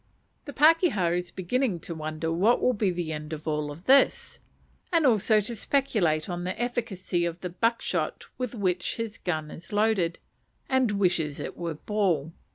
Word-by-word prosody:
The 290 - -6
pakeha 295 - +4
is 180 0 -3
beginning 190 +3 -1
to 170 - -6
wonder 155 +1 -3
what 205 +8 +3
will 250 - +2
be 205 -3 +1
the 175 -3 -3
end 150 +1 -6
of 155 +1 -7
all 150 -1 -1
this; 260 - +3 0.5
and 335 -3 +3
also 220 -3 +4
to 235 +3 -4
speculate 205 - +1
on 175 -2 -4
the 185 +4 -4
efficacy 225 -8 -2
of 170 0 -2
the 180 - -4
buck 230 +6 0
shot - - -2
with 250 -1 -3
which 185 -4 -1
his 230 -2 -5
gun 155 -3 -3
is 170 - -11
loaded, 205 -5 +1 0.5
and 260 -5 +2
wishes 175 -7 +1
it - - -5
was 170 -3 -4
ball. 175 -8 0
185 Hz, 170 wpm, -27 LUFS, 170-230 Hz, 0.5 s, pakeha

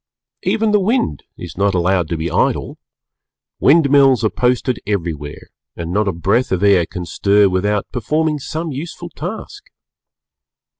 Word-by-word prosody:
Even 220 -1 +1
the 210 - +4
Wind 195 - 0 0.2
is - - -9
not 100 0 +1
allowed 90 -1 +1
to 85 - -3
be 80 +2 -3
idle; - - 0 0.8
wind 145 -1 +4
mills 135 -5 +5
are 110 - +2
posted 125 0 0
everywhere 80 -8 -4 0.3
and 85 0 -5
not 105 +1 +1
a - - +2
breath 100 +9 0
of 95 +1 0
air 95 -4 +4
can 90 -3 -6
stir 100 +4 +3
without 100 +2 0
performing 150 +5 -1
some 160 +4 -4
useful 165 +5 -7
task. 220 - -7
105 Hz, 150 wpm, -18 LUFS, 90-150 Hz, 0.8 s, mills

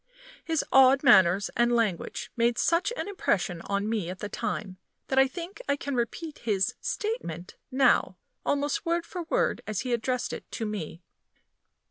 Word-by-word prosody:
His 325 -2 0
odd 265 +1 +6
manners 190 -5 +5
and 240 0 +3
language 215 -7 -1
made 235 0 +2
such 335 +6 +2
an - - -3
impression 190 - -1
on 200 +1 -1
me 215 -6 -1
at 185 - -5
the 210 - -5
time, 190 -3 -4 0.3
that 265 - +3
I 270 - +6
think 355 - -8
I 280 - +3
can 285 0 -5
repeat 260 +6 -3
his 200 -5 0
"statement" 185 - -4
now, 265 0 +3 0.3
almost 285 0 0
word 340 0 0
for 355 +1 -6
word - - +1
as 215 -3 -2
he 250 0 -2
addressed 245 +1 -1
it - - -8
to 225 - -3
me. 180 -5 -5
240 Hz, 165 wpm, -27 LUFS, 200-285 Hz, 0.3 s, odd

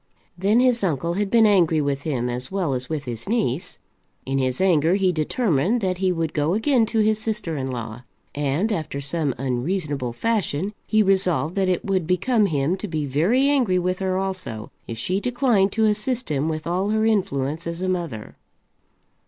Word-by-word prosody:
Then 200 +6 +2
his 250 -3 +3
uncle 170 -1 0
had 200 +2 -1
been 230 0 +5
angry 175 -6 +4
with 140 -1 -1
him, 130 -5 -2
as 125 +4 -3
well 185 -8 -1
as 125 0 -3
with 155 -3 -3
his 120 - -5
niece. 185 - -1 0.5
In 135 +1 -1
his 130 -1 -1
anger 175 -2 +3
he 190 -2 +2
determined 180 - +1
that 185 -2 -1
he 190 -1 +2
would 165 -3 -2
go 155 +4 +1
again 230 0 +2
to 225 -1 +1
his 215 0 +2
sister 215 -7 -2
in 135 -2 -3
law, 120 -2 -6 0.3
and, 145 +9 0
after 155 -7 -3
some 145 -1 -1
unreasonable 135 +1 -2
fashion, 200 - -1
he 215 -1 +3
resolved 185 -4 +2
that 190 -1 +2
it 180 - -1
would 185 -4 0
become 210 +4 +2
him 150 +2 0
to 210 - -5
be 155 -4 -2
very 180 - +2
angry 250 -10 +2
with 180 +1 -1
her 190 -1 -1
also, 185 - -4 0.2
if 115 - -6
she 185 - -1
declined 240 -4 +2
to 220 -1 +2
assist 220 +3 0
him 145 +2 0
with 155 -1 -4
all 185 +4 -1
her 220 +1 +1
influence 170 -8 0
as 170 +2 -4
a - - 0
mother. 170 -13 -4
180 Hz, 190 wpm, -23 LUFS, 145-210 Hz, 0.5 s, been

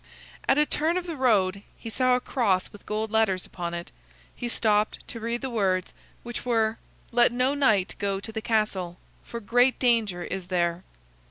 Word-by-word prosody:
At - - +5
a 300 - +5
turn 320 +4 +1
of 365 - -3
the 335 -2 -4
road, 205 -7 +2 0.2
he - - -10
saw 255 +2 +3
a - - +1
cross 205 -8 0
with 205 - -15
gold 215 0 -2
letters 220 -5 +2
upon 175 -1 -5
it. 170 0 -6 0.4
He 240 - -4
stopped 215 -2 +1
to 230 - -5
read 235 +2 -2
the 265 - -3
words, 190 -5 0 0.3
which 240 0 -6
were: 225 -2 +1 0.3
"Let 240 0 +5
no 255 +3 +1
knight 220 -9 +2
go 200 -1 -1
to 220 - -7
the 220 0 -4
castle, 205 -6 -1 0.3
for 235 - -6
great 245 +4 +3
danger 220 -8 +2
is 185 0 -5
there." 175 -1 0
220 Hz, 185 wpm, -26 LUFS, 190-245 Hz, 0.4 s, At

